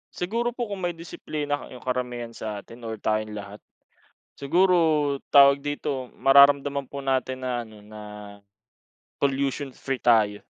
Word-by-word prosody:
Siguro 230 Hz, +6 st, -2 dB
po 240 Hz, -4 st, -4 dB
kung 200 Hz, -, -4 dB
may 175 Hz, -, -4 dB
disiplina 150 Hz, -3 st, -5 dB
yung 125 Hz, -, -12 dB
karamihan 125 Hz, -2 st, -3 dB
sa 105 Hz, -3 st, -6 dB
atin 115 Hz, -, -14 dB
or 110 Hz, -, -4 dB
tayong 110 Hz, 0 st, -2 dB
lahat. 105 Hz, 0 st, -8 dB, 0.7 s
Siguro, 160 Hz, -2 st, +2 dB
tawag 140 Hz, 0 st, +7 dB
dito, 145 Hz, -3 st, -4 dB
mararamdaman 140 Hz, 0 st, +5 dB
po 140 Hz, -, -8 dB
natin 130 Hz, -1 st, -1 dB
na 125 Hz, -1 st, -1 dB
ano, 110 Hz, -2 st, -12 dB
na 105 Hz, 0 st, -11 dB, 1.2 s
pollution-free 135 Hz, -1 st, -2 dB
tayo. 110 Hz, -4 st, +3 dB
135 Hz, 130 wpm, -25 LUFS, 120-145 Hz, 1.2 s, tawag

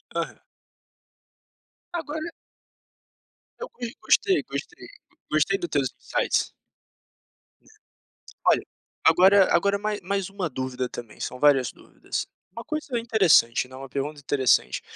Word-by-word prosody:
Aham. -, -, -4 dB, 1.5 s
Agora 315 Hz, -1 st, -4 dB, 1.4 s
Eu -, -, -6 dB, 0.3 s
gostei, 380 Hz, -2 st, +3 dB
gostei, -, -, -6 dB, 0.4 s
gostei 155 Hz, +6 st, +2 dB
do 175 Hz, -, -3 dB
teus 140 Hz, -3 st, 0 dB
insights. -, -, 0 dB, 2.0 s
Olha, -, -, +4 dB, 0.4 s
agora 185 Hz, +4 st, +6 dB
agora 200 Hz, +3 st, +2 dB
ma 210 Hz, +1 st, -1 dB
mais 195 Hz, +1 st, -2 dB
uma 195 Hz, -4 st, -3 dB
dúvida 130 Hz, -1 st, -3 dB
também, 120 Hz, -3 st, -9 dB
são 125 Hz, -, -5 dB
várias 135 Hz, -3 st, +4 dB
dúvidas, -, -, -6 dB, 0.2 s
uma 230 Hz, +4 st, -8 dB
coisa 305 Hz, -5 st, -3 dB
interessante, 190 Hz, -, +4 dB
né, 130 Hz, -, -13 dB
uma 135 Hz, +1 st, -8 dB
pergunta 145 Hz, +3 st, -4 dB
interessante: 135 Hz, -3 st, +2 dB
170 Hz, 110 wpm, -25 LUFS, 135-205 Hz, 2.0 s, agora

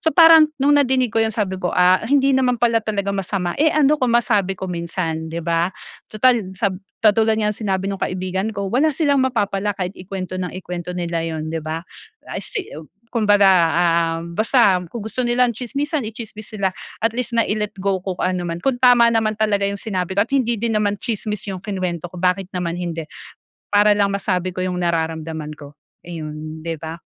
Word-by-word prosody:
So 320 Hz, -, +1 dB
parang 325 Hz, -2 st, +8 dB
nung 285 Hz, +1 st, +3 dB
nadinig 255 Hz, -4 st, +1 dB
ko 225 Hz, -, +2 dB
yun 225 Hz, -, +2 dB
sabi 190 Hz, -4 st, -2 dB
ko, 180 Hz, -, -1 dB
"Ah, 180 Hz, 0 st, +5 dB
hindi 275 Hz, -1 st, +3 dB
naman 255 Hz, -2 st, +2 dB
pala 230 Hz, -1 st, +2 dB
talaga 200 Hz, -2 st, -2 dB
masama, 190 Hz, -2 st, -2 dB
eh, 315 Hz, -, +5 dB
ano 300 Hz, 0 st, +3 dB
kung 255 Hz, -, +2 dB
masabi 205 Hz, -5 st, +2 dB
ko -, -, -6 dB
minsan." 170 Hz, -2 st, -3 dB
Di 165 Hz, 0 st, -5 dB
ba? 170 Hz, +1 st, +1 dB, 0.4 s
Tutal 220 Hz, -2 st, +2 dB
sa 200 Hz, -2 st, 0 dB, 0.3 s
katulad 220 Hz, +1 st, +4 dB
nga 210 Hz, -1 st, +1 dB
nung 210 Hz, -, -10 dB
sinabi 195 Hz, -3 st, -2 dB
ng 195 Hz, -, -6 dB
kaibigan 185 Hz, +3 st, -2 dB
ko, 200 Hz, 0 st, -3 dB
"Wala 280 Hz, +6 st, +3 dB
silang 285 Hz, -2 st, +2 dB
mapapala 205 Hz, -5 st, 0 dB
kahit 185 Hz, -1 st, -3 dB
ikuwento 185 Hz, 0 st, -5 dB
ng 180 Hz, -, -2 dB
ikuwento 180 Hz, -1 st, -6 dB
nila 170 Hz, -1 st, -2 dB
yun." 160 Hz, -1 st, -4 dB
Di 165 Hz, -, -2 dB
ba? 160 Hz, +2 st, -5 dB, 0.5 s
I -, -, -3 dB
see 405 Hz, -, -5 dB, 0.4 s
Kumbaga, 205 Hz, -4 st, +4 dB, 0.7 s
um, 170 Hz, +1 st, -8 dB
basta 215 Hz, -4 st, +4 dB
kung 235 Hz, -, -6 dB
gusto 220 Hz, +3 st, -3 dB
nila 240 Hz, +1 st, +3 dB
ng -, -, -1 dB
tsismisan, 280 Hz, +3 st, -2 dB
itsismis 220 Hz, -2 st, -8 dB
nila. 190 Hz, -2 st, 0 dB, 0.3 s
At 225 Hz, -, +3 dB
least 245 Hz, -1 st, -2 dB
nai-let 210 Hz, -2 st, 0 dB
go 195 Hz, -1 st, 0 dB
ko 185 Hz, 0 st, -4 dB
kung -, -, -2 dB
anuman, 175 Hz, -2 st, -3 dB
kung 260 Hz, -2 st, 0 dB
tama 245 Hz, -2 st, +6 dB
naman 215 Hz, -2 st, +1 dB
talaga 210 Hz, -2 st, +1 dB
yung 200 Hz, -, -3 dB
sinabi 190 Hz, -3 st, -3 dB
ko 200 Hz, -, +4 dB
at 255 Hz, -, -16 dB
hindi 240 Hz, -4 st, +2 dB
din 230 Hz, -1 st, 0 dB
naman 205 Hz, -1 st, +1 dB
tsismis 215 Hz, -3 st, -3 dB
yung 185 Hz, -, -6 dB
kinuwento 180 Hz, -4 st, -3 dB
ko, -, -, -10 dB
bakit 185 Hz, 0 st, +1 dB
naman 175 Hz, -1 st, -2 dB
hindi? 165 Hz, -2 st, -4 dB, 0.7 s
Para 205 Hz, 0 st, +6 dB
lang 200 Hz, -1 st, +2 dB
masabi 185 Hz, -2 st, -1 dB
ko 185 Hz, -, -4 dB
yung 180 Hz, -1 st, -2 dB
nararamdaman 160 Hz, -2 st, -2 dB
ko. 145 Hz, 0 st, -13 dB, 0.3 s
Ayun, 155 Hz, -2 st, -7 dB
di 165 Hz, -, -2 dB
ba? 160 Hz, +2 st, -7 dB
200 Hz, 195 wpm, -20 LUFS, 180-230 Hz, 0.7 s, parang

